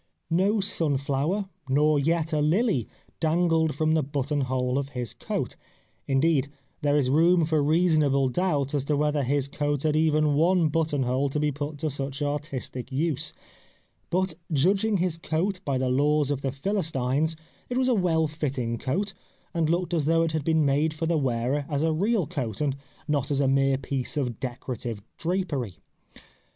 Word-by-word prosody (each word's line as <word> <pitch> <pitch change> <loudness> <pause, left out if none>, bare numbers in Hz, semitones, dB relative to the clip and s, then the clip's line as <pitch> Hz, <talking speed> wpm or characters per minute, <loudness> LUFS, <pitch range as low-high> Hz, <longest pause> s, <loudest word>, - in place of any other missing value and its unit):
No 195 +6 +3
sun 160 -7 +1
flower, 145 +9 -1 0.2
nor 150 +2 +3
yet 160 +2 0
a 150 - +2
lily, 170 - +2 0.3
dangled 160 -2 +2
from 155 +1 +1
the 160 - +3
button 145 +1 -1
hole 130 0 0
of 140 -1 -4
his 120 -4 -4
coat; - - -3 0.5
indeed, 140 0 +2 0.3
there 145 0 +2
is 130 -3 +2
room 165 +3 +4
for 155 -1 +1
reasonable 150 -3 +3
doubt 145 -1 0
as 145 -3 0
to 150 0 +1
whether 150 0 +1
his 140 +1 0
coat 145 0 -1
had 155 -1 +2
even 155 -1 +3
one 165 +2 +3
button 150 -3 0
hole 130 +3 0
to 150 - -2
be 150 0 +1
put 145 +1 -5
to 155 +1 -2
such 140 +1 -4
artistic 145 -3 -4
use. 150 +1 -1 0.8
But 185 0 0 0.2
judging 195 +8 +2
his 175 -2 0
coat 175 +4 -1
by 140 -6 0
the 130 0 0
laws 145 +2 +2
of 140 -2 -1
the 135 - -1
Philistines 155 -2 -1 0.3
it 250 - -1
was 260 0 +2
a 255 - +4
well 170 -6 +2
fitting 135 -7 -3
coat 190 +10 -1 0.4
and 165 -3 +1
looked 175 +1 0
as 160 -4 +1
though 165 +1 +3
it 165 - 0
had 155 -2 -1
been 160 0 +2
made 150 +3 +1
for 165 - -2
the 165 +1 +1
wearer 135 0 0
as 145 0 0
a 160 0 +2
real 200 +3 +1
coat 130 - -4
and 145 -3 0 0.3
not 145 -3 0
as 140 -2 0
a 140 - +3
mere 135 0 +3
piece 135 +2 -3
of 125 -6 -2
decorative 120 -4 -5 0.2
drapery. 160 - -2
150 Hz, 180 wpm, -26 LUFS, 135-165 Hz, 0.8 s, room